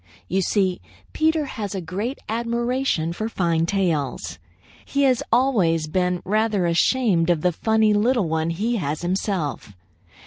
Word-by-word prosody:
You 190 Hz, +1 st, 0 dB
see, 190 Hz, -1 st, 0 dB, 0.3 s
Peter 315 Hz, -1 st, +1 dB
has 210 Hz, -7 st, -5 dB
a -, -, -2 dB
great 195 Hz, -, -4 dB
admiration 235 Hz, -5 st, -1 dB
for 220 Hz, +5 st, -3 dB
fine 170 Hz, -5 st, 0 dB
tails. 155 Hz, -, -1 dB, 0.4 s
He 280 Hz, 0 st, 0 dB
has 260 Hz, -1 st, +3 dB
always 205 Hz, -11 st, +2 dB
been 180 Hz, +2 st, -1 dB
rather 210 Hz, -1 st, +1 dB
ashamed 175 Hz, 0 st, +2 dB
of 170 Hz, -3 st, +2 dB
the 180 Hz, -, +2 dB
funny 220 Hz, +4 st, +2 dB
little 220 Hz, -1 st, +2 dB
one 160 Hz, 0 st, -1 dB
he 220 Hz, +8 st, -1 dB
has 150 Hz, -3 st, -3 dB
himself. 175 Hz, -, -2 dB
195 Hz, 140 wpm, -23 LUFS, 170-230 Hz, 0.4 s, has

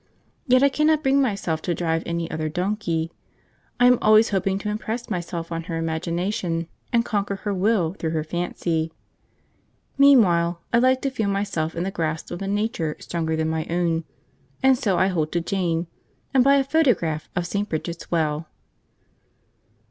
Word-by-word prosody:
Yet 255 Hz, +1 st, +5 dB
I 280 Hz, -, +6 dB
cannot 305 Hz, +2 st, +2 dB
bring 270 Hz, +1 st, +3 dB
myself 195 Hz, -, -1 dB
to 175 Hz, 0 st, -1 dB
drive 165 Hz, -1 st, 0 dB
any 170 Hz, 0 st, -2 dB
other 155 Hz, 0 st, -2 dB
donkey; 175 Hz, -2 st, -2 dB, 0.7 s
I 245 Hz, -, +5 dB
am 250 Hz, -1 st, +6 dB
always 215 Hz, +1 st, +5 dB
hoping 195 Hz, -1 st, 0 dB
to 210 Hz, +1 st, -4 dB
impress 220 Hz, +3 st, -4 dB
myself 170 Hz, -2 st, -4 dB
on 165 Hz, 0 st, -3 dB
her 165 Hz, -1 st, -3 dB
imagination, 165 Hz, +1 st, -2 dB, 0.2 s
and 235 Hz, -1 st, +2 dB
conquer 200 Hz, -2 st, -1 dB
her 200 Hz, +1 st, -3 dB
will 190 Hz, -3 st, +1 dB
through 165 Hz, -4 st, -3 dB
her 160 Hz, -1 st, -1 dB
fancy. 165 Hz, -1 st, -2 dB, 1.1 s
Meanwhile, 180 Hz, -12 st, +5 dB
I 235 Hz, -, +5 dB
like 260 Hz, +1 st, +3 dB
to 275 Hz, -, 0 dB
feel 220 Hz, -6 st, -1 dB
myself 195 Hz, -5 st, -1 dB
in 170 Hz, -, -2 dB
the 195 Hz, -, -2 dB
grasp 160 Hz, -3 st, -3 dB
of 175 Hz, -, -5 dB
a 195 Hz, -, -3 dB
nature 205 Hz, -6 st, -1 dB
stronger 160 Hz, -2 st, -2 dB
than 160 Hz, 0 st, 0 dB
my 160 Hz, 0 st, -2 dB
own, 170 Hz, -1 st, 0 dB, 0.6 s
and 265 Hz, 0 st, +6 dB
so 205 Hz, -7 st, 0 dB
I 185 Hz, -, +4 dB
hold 160 Hz, -4 st, -1 dB
to 175 Hz, -, +2 dB
Jane, 170 Hz, -2 st, -1 dB, 0.5 s
and 260 Hz, -2 st, +5 dB
buy 275 Hz, +1 st, +5 dB
a 275 Hz, -, +3 dB
photograph 245 Hz, -, +1 dB
of 175 Hz, -, -1 dB
St. 200 Hz, +4 st, -2 dB
Bridget's 170 Hz, +2 st, -4 dB
Well! 155 Hz, -1 st, 0 dB
180 Hz, 170 wpm, -23 LUFS, 165-220 Hz, 1.1 s, I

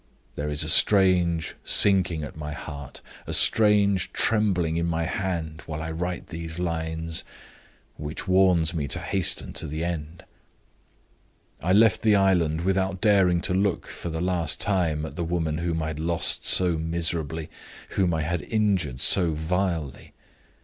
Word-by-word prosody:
There 75 Hz, +1 st, -4 dB
is 75 Hz, +1 st, 0 dB
a -, -, -4 dB
strange 90 Hz, -2 st, +3 dB
sinking 95 Hz, -5 st, +4 dB
at 75 Hz, -, -8 dB
my 75 Hz, -1 st, -6 dB
heart, 70 Hz, -2 st, -9 dB, 0.3 s
a -, -, -4 dB
strange 105 Hz, -3 st, +3 dB
trembling 95 Hz, -7 st, 0 dB
in 85 Hz, 0 st, -1 dB
my 85 Hz, 0 st, -1 dB
hand, 80 Hz, -4 st, -4 dB
while 75 Hz, -1 st, -5 dB
I 80 Hz, -, -5 dB
write 90 Hz, +2 st, -5 dB
these 80 Hz, 0 st, -6 dB
lines, 80 Hz, -1 st, -2 dB, 0.7 s
which 75 Hz, +5 st, -7 dB
warns 90 Hz, -3 st, +3 dB
me 75 Hz, -4 st, -3 dB
to 90 Hz, -, -1 dB
hasten 90 Hz, +1 st, +1 dB
to -, -, -2 dB
the 80 Hz, +2 st, -4 dB
end. 85 Hz, -1 st, -5 dB, 1.4 s
I 90 Hz, +3 st, +1 dB
left 110 Hz, -1 st, +4 dB
the 110 Hz, -2 st, +3 dB
island 85 Hz, -5 st, +2 dB
without 95 Hz, +1 st, -1 dB
daring 95 Hz, -4 st, +3 dB
to 90 Hz, -, 0 dB
look 95 Hz, 0 st, 0 dB
for 85 Hz, -, -7 dB
the 80 Hz, 0 st, -4 dB
last 90 Hz, -4 st, 0 dB
time 85 Hz, -6 st, 0 dB
at -, -, -9 dB
the 85 Hz, -, -2 dB
woman 80 Hz, -2 st, -2 dB
whom 85 Hz, -1 st, -2 dB
I 80 Hz, -, -3 dB
had 80 Hz, -1 st, -6 dB
lost 85 Hz, +1 st, +1 dB
so 90 Hz, -3 st, +4 dB
miserably, 80 Hz, -1 st, -3 dB, 0.4 s
whom 95 Hz, -3 st, 0 dB
I 80 Hz, -2 st, -1 dB
had 85 Hz, +1 st, -2 dB
injured 95 Hz, -, -1 dB
so 85 Hz, -4 st, +4 dB
vilely. 80 Hz, -2 st, -3 dB
85 Hz, 155 wpm, -25 LUFS, 80-95 Hz, 1.4 s, sinking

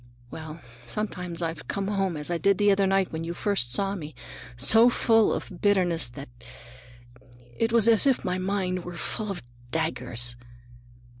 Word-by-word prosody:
Well, 155 Hz, 0 st, -8 dB, 0.2 s
sometimes 180 Hz, -, -4 dB
I've 165 Hz, -2 st, -4 dB
come 195 Hz, -1 st, -2 dB
home 195 Hz, -5 st, -1 dB
as 150 Hz, +3 st, -3 dB
I 170 Hz, -, -1 dB
did 200 Hz, +1 st, +3 dB
the 205 Hz, 0 st, +4 dB
other 195 Hz, 0 st, +2 dB
night 195 Hz, -1 st, +1 dB
when 160 Hz, 0 st, -4 dB
you 170 Hz, +1 st, -5 dB
first 185 Hz, -14 st, 0 dB
saw 195 Hz, +9 st, +1 dB
me, 155 Hz, -7 st, -7 dB, 0.4 s
so 220 Hz, -, +7 dB
full 225 Hz, -2 st, +3 dB
of 180 Hz, -, -5 dB
bitterness 180 Hz, -7 st, +2 dB
that 135 Hz, +3 st, -9 dB, 1.3 s
it 225 Hz, -, 0 dB
was 230 Hz, -1 st, +4 dB
as 230 Hz, +3 st, +5 dB
if 265 Hz, -, +2 dB
my 180 Hz, 0 st, -1 dB
mind 185 Hz, -1 st, -2 dB
were 175 Hz, -1 st, -8 dB
full 215 Hz, +4 st, -4 dB
of 195 Hz, -8 st, -5 dB, 0.3 s
daggers. 125 Hz, -6 st, -2 dB
185 Hz, 165 wpm, -26 LUFS, 160-205 Hz, 1.3 s, so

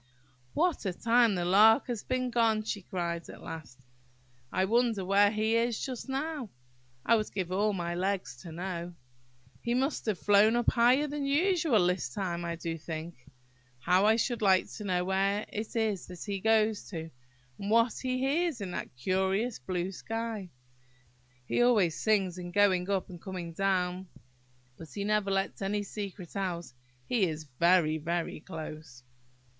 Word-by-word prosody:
"What 350 Hz, -2 st, +1 dB
a 185 Hz, -, -1 dB
time 230 Hz, +1 st, +3 dB
the 175 Hz, -1 st, -1 dB
Lark 215 Hz, +7 st, +6 dB
has 240 Hz, -5 st, -3 dB
been 255 Hz, -1 st, -1 dB
gone!" 225 Hz, -2 st, +2 dB
she 210 Hz, -1 st, -3 dB
cried, 170 Hz, -2 st, -4 dB
at -, -, -11 dB
last. 140 Hz, -5 st, -9 dB, 0.7 s
"I 185 Hz, +1 st, +1 dB
wonder 225 Hz, -2 st, +1 dB
where 200 Hz, +2 st, +5 dB
he 220 Hz, +1 st, +1 dB
is 230 Hz, -1 st, +1 dB
just 260 Hz, 0 st, -5 dB
now! 275 Hz, -2 st, -3 dB, 0.6 s
I 230 Hz, -, +5 dB
would 215 Hz, -1 st, -1 dB
give 185 Hz, -3 st, -3 dB
all 205 Hz, +3 st, +2 dB
my 175 Hz, -3 st, -3 dB
legs 185 Hz, -5 st, -2 dB
to 165 Hz, +6 st, -10 dB
know! 175 Hz, 0 st, -5 dB, 0.7 s
He 235 Hz, +1 st, 0 dB
must 265 Hz, 0 st, -1 dB
have 210 Hz, -4 st, +1 dB
flown 205 Hz, +4 st, +4 dB
up 240 Hz, -1 st, +3 dB
higher 250 Hz, +4 st, +4 dB
than 290 Hz, -1 st, -3 dB
usual 305 Hz, -, +3 dB
this 180 Hz, -7 st, 0 dB
time, 175 Hz, 0 st, -3 dB
I 170 Hz, 0 st, -3 dB
do 165 Hz, 0 st, -4 dB
think! 160 Hz, -3 st, -7 dB, 0.5 s
How 180 Hz, +10 st, +3 dB
I 220 Hz, -, +5 dB
should 235 Hz, +1 st, -1 dB
like 190 Hz, -3 st, +3 dB
to 210 Hz, -, -7 dB
know 180 Hz, -2 st, 0 dB
where 195 Hz, +2 st, +1 dB
it 215 Hz, +2 st, -5 dB
is 215 Hz, -5 st, 0 dB
that 180 Hz, -2 st, -8 dB
he 200 Hz, -2 st, -3 dB
goes 220 Hz, 0 st, +2 dB
to, 165 Hz, -3 st, -6 dB, 0.5 s
and 200 Hz, -, -4 dB
what 230 Hz, +1 st, +4 dB
he 255 Hz, -1 st, -1 dB
hears 285 Hz, +2 st, 0 dB
in 195 Hz, -3 st, -5 dB
that 135 Hz, -, -6 dB
curious 190 Hz, -, 0 dB
blue 180 Hz, +7 st, -3 dB
sky! 225 Hz, -1 st, -4 dB, 1.0 s
He 240 Hz, -, +1 dB
always 210 Hz, -9 st, +4 dB
sings 195 Hz, -5 st, +1 dB
in 175 Hz, 0 st, -6 dB
going 185 Hz, -1 st, +3 dB
up 195 Hz, -2 st, 0 dB
and 175 Hz, -2 st, -10 dB
coming 180 Hz, -3 st, -6 dB
down, 185 Hz, 0 st, 0 dB, 0.7 s
but 160 Hz, -, -11 dB
he 200 Hz, -, -4 dB
never 210 Hz, -1 st, +1 dB
lets 195 Hz, 0 st, -1 dB
any 205 Hz, +1 st, -1 dB
secret 200 Hz, -3 st, -7 dB
out. 175 Hz, -6 st, -3 dB, 0.3 s
He 230 Hz, -6 st, +2 dB
is 155 Hz, 0 st, -5 dB, 0.2 s
very, 170 Hz, -3 st, +4 dB
very 170 Hz, +2 st, -2 dB
close!" 155 Hz, -5 st, -9 dB
195 Hz, 170 wpm, -30 LUFS, 175-225 Hz, 1.0 s, Lark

